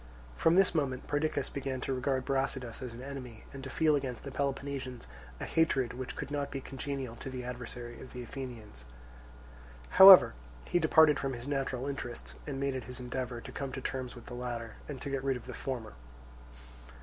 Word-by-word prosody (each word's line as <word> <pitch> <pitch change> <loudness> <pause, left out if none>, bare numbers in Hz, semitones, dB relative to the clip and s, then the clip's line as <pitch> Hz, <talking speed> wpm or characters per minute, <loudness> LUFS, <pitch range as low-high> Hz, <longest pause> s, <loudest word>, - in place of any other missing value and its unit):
From 165 +1 +4
this 195 -1 +5
moment 135 -5 -1
Perdiccas 145 -1 0
began 135 -1 -3
to 135 - -1
regard 130 0 0
Brasidas 135 -3 -1
as 125 -2 -5
an 120 +2 -8
enemy 130 -5 -7
and 135 -1 -8
to 135 - -5
feel 155 +2 +3
against 130 -4 -3
the 140 - -6
Peloponnesians 135 - -3 0.3
a - - -3
hatred 140 -6 +2
which 130 0 -5
could 140 - -5
not 145 -1 -1
be 135 - -4
congenial 135 -2 -5
to 135 - -6
the 130 -1 -5
adversary 120 -1 -6
of - - -10
the 125 -1 -6
Athenians. 115 - -8 1.0
However, 190 - +11 0.3
he 175 - +2
departed 160 -2 +6
from 135 -1 -1
his 120 +1 -7
natural 135 -2 -1
interests 135 -4 -5
and 135 -2 -3
made 140 0 0
it 130 -3 -4
his 125 +1 -7
endeavour 125 -1 -4
to - - -9
come 140 -2 -4
to - - -3
terms 130 -1 -4
with 120 - -11
the - - -9
latter 120 -2 -5
and 140 -3 -5
to 140 - -3
get 135 -1 -1
rid 135 -2 +1
of 120 - -12
the - - -7
former. 120 -5 -4
130 Hz, 195 wpm, -32 LUFS, 125-140 Hz, 1.0 s, However